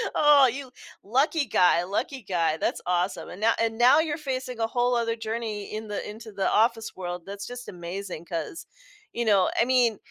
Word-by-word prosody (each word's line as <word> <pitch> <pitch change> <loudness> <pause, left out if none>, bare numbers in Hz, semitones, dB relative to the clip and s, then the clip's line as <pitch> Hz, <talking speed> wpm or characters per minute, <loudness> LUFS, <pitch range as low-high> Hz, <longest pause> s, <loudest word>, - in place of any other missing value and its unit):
Oh, 290 -3 +6
you 265 0 -7 0.3
lucky 280 +7 +1
guy, 180 -4 +3
lucky 230 +7 -3
guy, 170 -4 0
that's - - -1
awesome, 180 +2 -1
and - - -9
now 225 +1 +4
and 225 -1 0
now 250 +6 +6
you're 310 -2 0
facing 260 -5 -4
a 225 - +1
whole 245 +1 +1
other 230 -1 0
journey 220 -2 -4
in 215 0 -5
the 205 - -4
into 220 +1 -9
the 195 -1 0
office 225 0 +1
world, 175 -2 -5
that's 200 0 -7
just 245 0 -8
amazing 175 -1 -6
'cause, 170 - -5 0.5
you 235 - -2
know 200 -4 +4
I - - +4
mean, 245 -4 +3
225 Hz, 190 wpm, -26 LUFS, 195-250 Hz, 0.5 s, Oh